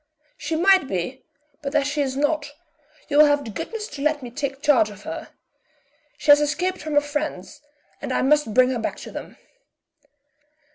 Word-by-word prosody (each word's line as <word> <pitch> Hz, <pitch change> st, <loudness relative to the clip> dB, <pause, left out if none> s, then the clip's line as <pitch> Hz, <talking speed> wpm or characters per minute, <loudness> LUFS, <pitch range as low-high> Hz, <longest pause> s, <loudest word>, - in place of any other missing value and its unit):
"She 320 Hz, +2 st, -3 dB
might 370 Hz, -2 st, +4 dB
be, 190 Hz, +7 st, -3 dB, 0.4 s
but 280 Hz, 0 st, -4 dB
as 290 Hz, -2 st, +3 dB
she 290 Hz, +1 st, -1 dB
is 265 Hz, -1 st, -2 dB
not, 295 Hz, 0 st, 0 dB, 0.6 s
you 290 Hz, -, +2 dB
will 305 Hz, -, +9 dB
have 290 Hz, -1 st, +1 dB
the 225 Hz, -, -6 dB
goodness 430 Hz, -, -5 dB
to 280 Hz, -, -8 dB
let 300 Hz, -1 st, 0 dB
me 240 Hz, -, -7 dB
take 275 Hz, +1 st, -4 dB
charge 275 Hz, -8 st, +4 dB
of 205 Hz, 0 st, -12 dB
her. -, -, -6 dB, 0.9 s
She 295 Hz, -, +4 dB
has 290 Hz, 0 st, +7 dB
escaped 355 Hz, +6 st, -1 dB
from 305 Hz, -1 st, -4 dB
her 290 Hz, -, +6 dB
friends, 290 Hz, -4 st, -4 dB, 0.4 s
and -, -, -4 dB
I -, -, +1 dB
must 295 Hz, -3 st, +3 dB
bring 255 Hz, +3 st, +4 dB
her 250 Hz, -, -2 dB
back 220 Hz, -, -2 dB
to -, -, -9 dB
them." -, -, -8 dB
290 Hz, 190 wpm, -23 LUFS, 260-300 Hz, 0.9 s, will